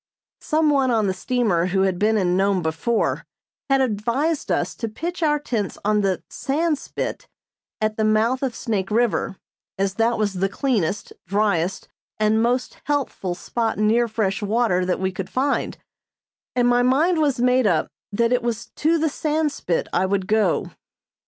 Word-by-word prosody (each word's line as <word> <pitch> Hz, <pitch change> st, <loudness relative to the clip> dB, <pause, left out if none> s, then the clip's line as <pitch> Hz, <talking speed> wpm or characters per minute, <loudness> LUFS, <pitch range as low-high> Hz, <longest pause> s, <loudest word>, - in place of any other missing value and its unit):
Some 310 Hz, 0 st, +2 dB
one 270 Hz, -2 st, +2 dB
on 225 Hz, -3 st, +2 dB
the 190 Hz, -, +1 dB
steamer 205 Hz, -7 st, 0 dB
who 190 Hz, +1 st, +1 dB
had 190 Hz, -2 st, 0 dB
been 215 Hz, +2 st, +3 dB
in 180 Hz, -3 st, +1 dB
Nome 195 Hz, -1 st, +2 dB
before 165 Hz, +9 st, 0 dB, 0.5 s
had 270 Hz, 0 st, +4 dB
advised 260 Hz, +7 st, 0 dB
us -, -, 0 dB
to 230 Hz, -, -3 dB
pitch 345 Hz, +11 st, -5 dB
our 300 Hz, -2 st, +3 dB
tents 230 Hz, -9 st, -3 dB
on 210 Hz, 0 st, +3 dB
the 190 Hz, -2 st, 0 dB
"Sandspit" 300 Hz, +1 st, -2 dB, 0.5 s
at 215 Hz, 0 st, -1 dB
the 220 Hz, -, +1 dB
mouth 220 Hz, +4 st, +2 dB
of 260 Hz, -4 st, -2 dB
Snake 205 Hz, -5 st, -2 dB
River, 225 Hz, -3 st, 0 dB, 0.4 s
as 195 Hz, 0 st, 0 dB
that 230 Hz, +3 st, +1 dB
was 210 Hz, -2 st, 0 dB
the 195 Hz, +1 st, 0 dB
cleanest, 210 Hz, -, -1 dB
driest 195 Hz, -3 st, 0 dB, 0.3 s
and 215 Hz, +1 st, +2 dB
most 245 Hz, +2 st, 0 dB
healthful 275 Hz, -11 st, -1 dB
spot 225 Hz, +4 st, -2 dB
near 225 Hz, +3 st, +3 dB
fresh 215 Hz, -2 st, -1 dB
water 205 Hz, -4 st, +1 dB
that 180 Hz, -, 0 dB
we 190 Hz, 0 st, 0 dB
could 190 Hz, 0 st, -6 dB
find; 275 Hz, +2 st, -1 dB, 0.8 s
and 245 Hz, -1 st, +3 dB
my 245 Hz, 0 st, +4 dB
mind 305 Hz, +8 st, +3 dB
was 280 Hz, -4 st, +1 dB
made 250 Hz, -1 st, +3 dB
up 165 Hz, -5 st, +2 dB, 0.2 s
that 230 Hz, +4 st, +2 dB
it 250 Hz, -, +2 dB
was 230 Hz, -1 st, -3 dB
to 325 Hz, +2 st, +2 dB
the 320 Hz, 0 st, +1 dB
Sandspit 300 Hz, -, -1 dB
I 185 Hz, +2 st, +2 dB
would 195 Hz, -1 st, 0 dB
go. 210 Hz, -3 st, +1 dB
220 Hz, 165 wpm, -22 LUFS, 195-255 Hz, 0.8 s, had